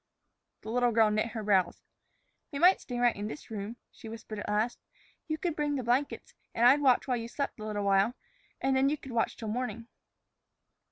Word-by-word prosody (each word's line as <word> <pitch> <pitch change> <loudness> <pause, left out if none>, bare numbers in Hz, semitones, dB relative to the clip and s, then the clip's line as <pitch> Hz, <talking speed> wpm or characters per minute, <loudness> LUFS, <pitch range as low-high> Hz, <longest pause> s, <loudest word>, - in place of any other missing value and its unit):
The 220 - -6
little 245 0 +2
girl 220 -1 +4
knit 215 +2 +1
her 220 -2 -4
brows. 190 -4 +2 0.7
"We 280 - -4
might 360 +6 +5
stay 245 - -5
right 240 -1 +3
in 205 +1 -4
this 230 +2 -9
room," 210 +1 -5 0.2
she 225 - -11
whispered 220 -1 -7
at - - -5
last. 215 +3 0 0.5
"You 310 -1 -1
could 335 -1 -2
bring 295 -1 0
in - - 0
the 260 - -2
blankets 250 +5 -1 0.2
and 235 - +3
I'd 275 +4 +7
watch 260 -2 +4
while 250 -2 +1
you 230 0 -5
slept 275 0 -4
a 215 - -6
little 210 -1 -2
while; 200 +4 +3 0.4
and 270 0 +1
then 265 +1 +4
you 300 - 0
could 270 - -10
watch 235 -1 0
till 220 - -5
morning." 230 0 -3
235 Hz, 215 wpm, -30 LUFS, 215-265 Hz, 0.7 s, I'd